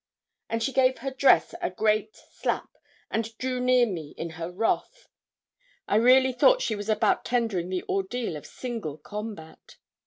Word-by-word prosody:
And 230 0 -1
she 270 - -1
gave 260 -1 +3
her 270 +3 -4
dress 265 +1 +4
a - - 0
great 215 +3 0
slap, - - -4 0.4
and 225 0 -3
drew 255 0 -2
near 250 -1 +4
me, 165 -9 -6
in 165 - -5
her 165 +1 -6
wrath. 220 +5 -2 0.8
I 205 - +2
really 255 +3 +5
thought - - +4
she 225 - 0
was 205 +1 -6
about 215 -1 +2
tendering 225 -8 -1
the 185 -1 -2
ordeal 195 0 -2
of 150 - -9
single 225 - -5
combat. 205 -1 -9
225 Hz, 160 wpm, -26 LUFS, 185-250 Hz, 0.8 s, really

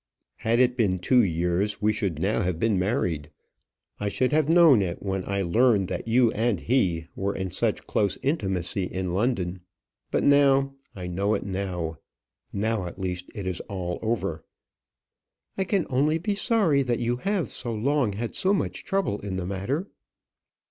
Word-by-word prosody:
"Had 115 +1 +1
it 125 -1 +4
been 100 -7 +1
two 125 +8 +4
years, 90 +2 0
we 105 0 +2
should 100 -7 -2
now 105 +6 +1
have 90 -4 -1
been 105 +1 +1
married. 90 - -1 0.7
I 105 - -1
should 130 +5 0
have 155 0 +2
known 165 -9 +7
it 90 -2 -2
when 95 -1 -2
I 100 0 0
learned 105 +1 +3
that - - -4
you 115 0 +4
and 110 -3 0
he 90 -10 +1
were 100 +1 -2
in 95 -1 -3
such - - -1
close 100 -3 0
intimacy 95 - -1
in 90 -1 -3
London. 95 -4 -1 0.5
But - - 0
now 140 -1 +4 0.2
I 90 -2 -6
know 100 +4 0
it 100 - -4
now. 90 -5 -3 0.5
Now 105 -2 -1
at 85 - -9
least 90 -1 -4
it 100 - -5
is 90 -2 -2
all 90 -3 -3
over." 110 -9 -2 1.1
"I 190 - -1
can 195 -3 +1
only 145 +5 +2
be 205 +5 -1
sorry 200 - +2
that 120 -3 0
you 120 0 -1
have 185 - -1
so 120 - -4
long 120 0 +1
had 115 +3 -4
so 195 +2 +2
much - - -3
trouble 195 - -1
in 100 -2 -5
the 95 -1 -3
matter." 100 - -2
105 Hz, 175 wpm, -26 LUFS, 95-130 Hz, 1.1 s, known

